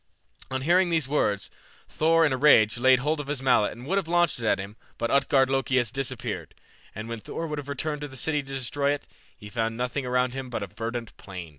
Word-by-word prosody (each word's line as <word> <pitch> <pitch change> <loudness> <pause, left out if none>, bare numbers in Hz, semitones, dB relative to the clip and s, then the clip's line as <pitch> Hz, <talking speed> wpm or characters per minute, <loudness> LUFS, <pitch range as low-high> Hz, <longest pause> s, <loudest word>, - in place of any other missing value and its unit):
On 130 0 -2
hearing 175 +4 +4
these 160 -5 +1
words 105 -8 0 0.4
Thor 165 +1 +3
in 145 - +2
a - - 0
rage 125 -6 +5
laid 130 0 +5
hold 150 +3 0
of 145 - -5
his 145 -2 -2
mallet 125 -5 +3
and 120 +3 -11
would 195 +7 +1
have 180 - -6
launched 175 -5 +2
it 115 - -4
at - - +3
him, 100 +2 -7 0.2
but 115 - -1
Utgard 135 -1 +4
Loki 135 -1 +1
had 120 -2 0
disappeared, 135 -3 -4 0.4
and 110 +1 -6
when 115 -1 -5
Thor 165 - -5
would 150 -2 -4
have 145 -1 -8
returned 150 +1 -2
to 145 - -4
the 135 -1 -11
city 150 +2 +1
to 135 -1 -12
destroy 140 +2 0
it, 145 - -12 0.3
he 105 - -11
found 115 +1 -2
nothing 125 +3 -2
around 125 0 +1
him 135 -1 -5
but 115 -4 -3
a - - -2
verdant 115 +3 -5
plain. 90 -4 -8
130 Hz, 240 wpm, -26 LUFS, 115-145 Hz, 0.4 s, rage